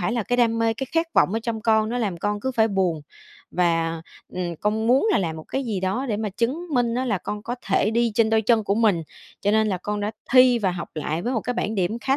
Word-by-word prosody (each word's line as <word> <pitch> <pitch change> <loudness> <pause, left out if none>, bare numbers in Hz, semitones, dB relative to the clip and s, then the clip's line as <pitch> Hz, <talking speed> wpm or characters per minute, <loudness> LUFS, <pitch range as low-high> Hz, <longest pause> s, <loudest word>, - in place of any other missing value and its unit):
phải 180 +6 -1
là 235 -1 0
cái 245 +4 -1
đam 230 -2 +2
mê, 225 0 +1
cái 270 - -4
khát 330 +1 +2
vọng 190 - +4
ở 225 - 0
trong 230 -1 -3
con, 220 -1 +2
nó 245 +2 -2
làm 205 -7 -1
con 205 +3 -2
cứ 260 - -1
phải 225 -2 +3
buồn 185 -6 0 0.5
và, 165 -2 0 0.3
ừm, 175 -2 -3
con 215 +2 0
muốn 260 - +4
là - - +3
làm 165 -4 -2
một 160 - -8
cái 270 0 -2
gì 210 -5 -2
đó 195 +9 -1
để 215 - 0
mà 215 0 -2
chứng 250 - -2
minh 240 -2 +1
á 255 - 0
là 215 -7 0
con 210 +3 -5
có 240 +3 -3
thể 195 +2 +2
đi 235 0 +1
trên 225 0 +3
đôi 220 0 +3
chân 220 0 +2
của 200 - +1
mình, 210 -6 +2 0.4
cho 205 - +1
nên 220 0 +3
là 185 -3 -1
con 210 +2 -3
đã 205 +1 -1 0.2
thi 255 -1 +6
và 195 -4 +1
học 175 -1 -5
lại 155 +2 -3
với 245 - -1
một 230 - 0
cái 245 +4 -3
bảng 220 -2 -2
điểm 195 +3 -1
khá 270 +3 +1
220 Hz, 280 wpm, -23 LUFS, 190-235 Hz, 0.5 s, thi